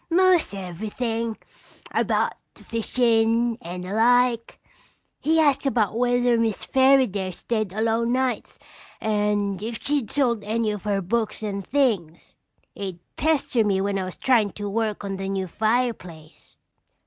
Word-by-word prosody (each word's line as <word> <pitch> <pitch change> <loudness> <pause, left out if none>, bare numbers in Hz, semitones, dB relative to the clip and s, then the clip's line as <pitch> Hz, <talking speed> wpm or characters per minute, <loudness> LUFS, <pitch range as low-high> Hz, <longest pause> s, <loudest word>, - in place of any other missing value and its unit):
"Most 360 - +3
everything. 220 +5 -3 0.5
About - - +1 0.2
the - - -16
fishin' 230 0 +1
and 180 +1 -6
the 185 +2 -5
like. 240 +1 +2 0.6
He 320 +2 +2
asked 285 -3 +3
about 220 -6 +1
whether 245 0 +2
Miss 225 -3 -1
Fairaday 260 -8 +3
stayed 215 +1 -2
alone 225 +3 0
nights 255 0 -1 0.4
and 205 -2 0
if 225 +1 -4
she'd 280 -6 -1
sold 240 -7 0
any 220 +1 0
of 210 -1 -6
her 200 -2 0
books 220 +3 -2
and 200 -2 -3
things. 205 - -1 0.4
He'd 190 -3 -5 0.2
pester 285 -6 +1
me 200 -2 +1
when 195 0 0
I 190 - -2
was 185 - -7
tryin' 225 -7 +2
to 205 +3 -5
work 215 0 -2
on 195 -1 -4
the 195 0 -4
new 195 -1 -1
fireplace. 215 -7 -3
225 Hz, 140 wpm, -24 LUFS, 200-245 Hz, 0.6 s, Most